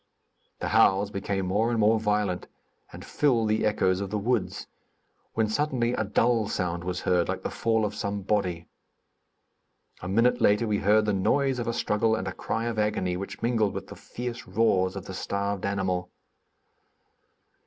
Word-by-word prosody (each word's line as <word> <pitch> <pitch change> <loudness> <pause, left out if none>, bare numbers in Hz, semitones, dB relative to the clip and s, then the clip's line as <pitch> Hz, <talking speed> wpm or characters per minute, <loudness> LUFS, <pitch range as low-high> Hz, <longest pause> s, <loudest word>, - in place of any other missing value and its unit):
The - - -3
howls 100 +1 +4
became 100 -1 -2
more 105 +5 +1
and 120 - 0
more 110 +1 +4
violent, 105 -4 -1 0.4
and - - -10
filled 120 -7 +1
the 110 0 +2
echoes 95 -3 +1
of 100 - -3
the 105 - -2
woods, 110 0 -1 0.7
when 110 -1 +2
suddenly 125 0 0
a 110 - 0
dull 115 +1 +2
sound 85 -3 -2
was 90 0 -3
heard, 90 -1 +1
like - - -3
the - - -3
fall 110 -1 +1
of 105 - -3
some 100 -2 -3
body. 90 -5 -1 1.3
A 90 - -5
minute 115 +6 +2
later 105 +3 +4
we 105 -2 0
heard 105 +2 +3
the 105 - +1
noise 125 +7 +1
of 120 - -3
a - - +1
struggle 110 0 +1
and 95 -1 -4
a 95 - -3
cry 115 - -3
of 115 -2 -2
agony 100 -4 0
which 95 +4 -7
mingled 115 -4 +1
with - - -4
the - - -9
fierce 120 -1 -7
roars 95 -2 +2
of 95 -1 -6
the 95 - -7
starved 100 +1 -2
animal. 95 -3 -1
105 Hz, 175 wpm, -27 LUFS, 95-115 Hz, 1.3 s, howls